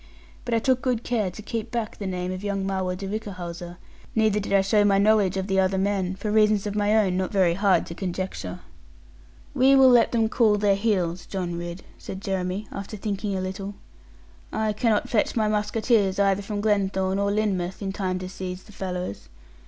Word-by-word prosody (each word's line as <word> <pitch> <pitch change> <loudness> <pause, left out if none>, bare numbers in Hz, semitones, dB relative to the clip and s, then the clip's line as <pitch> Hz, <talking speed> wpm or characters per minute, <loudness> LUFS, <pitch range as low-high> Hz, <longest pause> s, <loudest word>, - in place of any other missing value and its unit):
But 240 -1 0
I - - +4
took 255 +2 +2
good 240 -2 0
care 220 -6 0
to 180 +4 -10
keep 225 0 -4
back 230 -3 -3
the 200 - -3
name 180 -1 -3
of 185 +1 -5
young 200 -1 -1
Marwood 190 -1 -1
de 195 +1 -5
Whichehalse; 180 -4 -6 0.4
neither 215 -2 +3
did 200 - -5
I 200 -1 +5
show 205 +2 +3
my 200 -1 +4
knowledge 200 -2 +3
of 190 - -1
the 195 -1 +1
other 190 0 +2
men; 190 -1 0
for 210 +2 -3
reasons 215 -1 +3
of 205 - -2
my 210 +1 +2
own 190 -4 +2
not 185 0 -1
very 185 -4 +3
hard 195 +1 +2
to - - -7
conjecture. 175 - -4 0.9
'We 270 0 +5
will 265 -1 +7
let 240 -2 +5
them 225 -2 +2
cool 220 -2 +3
their 205 -1 +3
heels, 190 -4 0
John 180 -3 -3
Ridd,' 175 +1 -6 0.2
said 190 - -7
Jeremy, 190 +1 -3
after 200 +2 -6
thinking 200 -1 -3
a - - -2
little. 195 +2 -5 0.8
'I 220 -1 0
cannot 215 0 +1
fetch 215 - +1
my 220 -2 +2
musketeers 210 -1 +1
either 200 0 +2
from 205 +1 -4
Glenthorne 195 -2 +1
or 200 0 +1
Lynmouth, 190 -4 -1
in 195 - -2
time 185 -2 -2
to 185 0 -5
seize 185 -1 -6
the - - -16
fellows. 180 - -5
200 Hz, 200 wpm, -25 LUFS, 185-215 Hz, 0.9 s, will